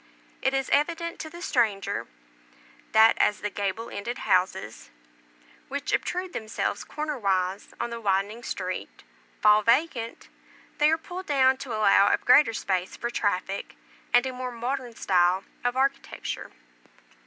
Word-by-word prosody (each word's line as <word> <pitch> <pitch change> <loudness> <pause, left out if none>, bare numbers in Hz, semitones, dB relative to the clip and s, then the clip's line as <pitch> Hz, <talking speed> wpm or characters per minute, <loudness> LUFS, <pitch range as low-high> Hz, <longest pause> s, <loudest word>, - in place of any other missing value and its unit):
It 265 0 +1
is 270 0 -1
evident 335 +3 0
to 315 - -6
the 345 +2 -10
stranger, 220 - 0 0.8
that 220 +1 +6
as 210 - +2
the 210 - -3
gable 205 +3 -3
ended 235 +4 -4
houses, 185 -9 0 0.8
which 280 +1 -3
obtrude 365 0 -1
themselves 220 0 -3
corner 300 -2 -4
wise 190 -1 -1
on 235 - -2
the 235 0 -5
widening 200 +2 0
street, 185 -5 -5 0.4
fall 210 0 +6
vacant, 235 0 0 0.5
they 300 +1 +5
are 320 - +3
pulled 360 +3 -8
down 265 -3 +4
to 260 -4 -5
allow 200 -1 +5
of - - 0
greater 255 0 +6
space 185 -4 -2
for 235 - -3
traffic, 195 -3 -2 0.4
and 245 +1 +5
a 260 - -3
more 255 0 -4
modern 245 0 -4
style 180 -1 +2 0.2
of 245 +1 0
architecture. 275 +1 -2
235 Hz, 145 wpm, -26 LUFS, 200-275 Hz, 0.8 s, that